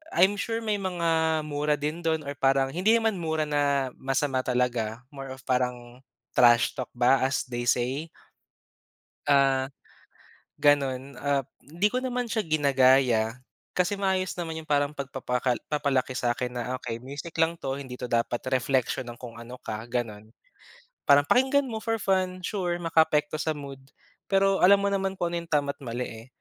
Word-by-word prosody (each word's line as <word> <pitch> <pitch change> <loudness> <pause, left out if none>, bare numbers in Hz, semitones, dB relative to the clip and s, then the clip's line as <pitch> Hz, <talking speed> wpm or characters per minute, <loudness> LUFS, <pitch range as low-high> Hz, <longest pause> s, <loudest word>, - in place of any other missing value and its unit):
I'm 190 +3 +5
sure 225 +1 -1
may 215 -1 0
mga 165 -4 +1
mura 150 0 0
din 150 +3 -3
dun 160 -2 0
or 140 - -5
parang 135 0 +3
hindi 185 +9 +3
naman 225 -2 +1
mura 160 -2 -1
na 140 -3 +1
masama 135 0 0
talaga, 125 -2 -1
more 135 -1 -8
of 130 - -17
parang 125 -1 -2 0.3
trashtalk 120 +1 +4
ba 130 +2 +4
as 135 - -1
they 120 0 -2
say. 130 +7 0 1.2
Ah, 135 -2 +4 0.9
ganun. 140 -2 +2
Ah, 140 -1 +1 0.2
di 170 +8 -1
ko 255 0 -1
naman 250 -1 -2
siya 225 -1 -1
ginagaya. 130 - +3 0.3
Kasi 185 +3 0
maayos 190 -2 0
naman 165 -2 -4
yung 155 - -14
parang 145 -1 +2
pagpapakal 130 -3 -2
papalaki 140 -4 0
sa'kin 120 +1 -1
na, 125 +1 -3
"Okey, 115 -1 -4
music 140 +7 -8
lang 165 +1 +3
'to, 135 -5 -4
hindi 130 -3 -7
'to 125 -1 -6
dapat 120 0 0
reflection 130 0 0
ng 120 -1 -8
kung 120 -2 -9
ano 120 +2 -9
ka," 110 +2 -5
gano'n. 115 -4 -4 0.8
Parang 140 0 +7
pakinggan 265 - +3
mo 225 -4 -5
for 225 0 -1
fun, 185 -2 0
sure 180 -5 -1
makaapekto 160 -3 +2
sa 155 - 0
mood. 140 -2 -8 0.5
Pero 195 0 +3
alam 200 +2 +7
mo 200 - +1
naman 195 -1 -1
kung 175 -1 -1
ano 170 - -1
yung 170 - -14
tama 145 -2 +1
at 145 - -31
mali, 125 -1 -3
eh. 115 +1 -10
140 Hz, 165 wpm, -27 LUFS, 125-170 Hz, 1.2 s, Parang